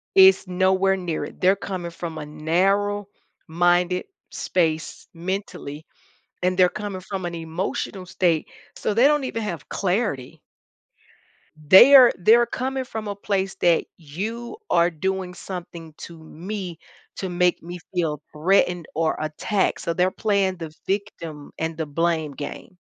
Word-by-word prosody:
It's 190 0 +7
nowhere 190 +1 +2
near 175 -4 -3
it; - - -13
they're 190 +2 +6
coming 180 -3 -5
from 170 -1 -6
a 150 - -5
narrow-minded 180 +1 0 0.2
space 160 -3 -1
mentally, 170 -4 -5 0.6
and 185 0 +1
they're 180 -1 +6
coming 205 -3 -5
from 190 -1 -5
an 170 - -4
emotional 175 +3 -4
state, 175 -3 0 0.2
so 210 - -2
they 240 +5 +5
don't 295 -2 +3
even 230 -3 -3
have 175 -9 -5
clarity. 185 - -2 1.2
They 190 - +8
are 255 -3 +9
they're 230 +6 +6
coming 260 +2 -3
from 220 -4 -6
a 200 - -4
place 195 -1 -1
that 170 -2 +3
"you 215 - -6
are 170 0 +4
doing 190 +2 -3
something 170 -3 -8
to 170 -1 -10
me 180 +2 -6 0.4
to 190 - -4
make 180 0 +1
me 175 +1 -7 0.2
feel 160 -5 -1
threatened 175 +2 +2
or 160 0 +1
attacked," 155 +6 -1
so 170 - -2
they're 180 +2 +2
playing 195 -2 0
the 160 -2 -8
victim 170 -7 -4
and 160 0 -2
the 160 - -2
blame 160 0 0
game. 145 +6 -8
180 Hz, 140 wpm, -23 LUFS, 165-200 Hz, 1.2 s, are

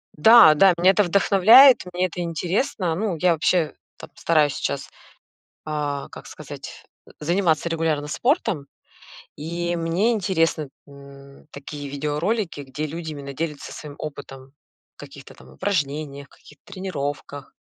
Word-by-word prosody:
Да, 190 -1 +8
да, 190 +3 +5
меня 185 +2 +5
это 205 +1 +2
вдохновляет, 205 +8 +6
мне 180 +1 0
это 175 +1 -7
интересно. 175 - -2
Ну, 200 -1 -2
я 180 +1 +3
вообще 160 -1 +1 0.2
там - - -11
стараюсь 150 -4 +2
сейчас, - - -4 0.8
а, 145 -2 -3
как - - -12
сказать, - - -10 0.4
заниматься 170 0 +1
регулярно 160 -3 -1
спортом. 190 - -1 0.7
И 170 +3 -3
мне 170 +7 0
интересны 165 - 0 0.2
н 140 0 -15
такие 145 +1 -8
видеоролики, 150 +5 -2
где 140 +3 -6
люди 160 +1 -6
именно 140 -1 -8
делятся 150 0 -5
своим 150 -2 -10
опытом 135 -3 -9 0.4
в - - -58
каких-то - - -12
там 65 - -18
упражнениях, 140 - -3
каких-то 150 - -20
тренировках. 145 -6 -6
160 Hz, 130 wpm, -22 LUFS, 145-180 Hz, 0.8 s, Да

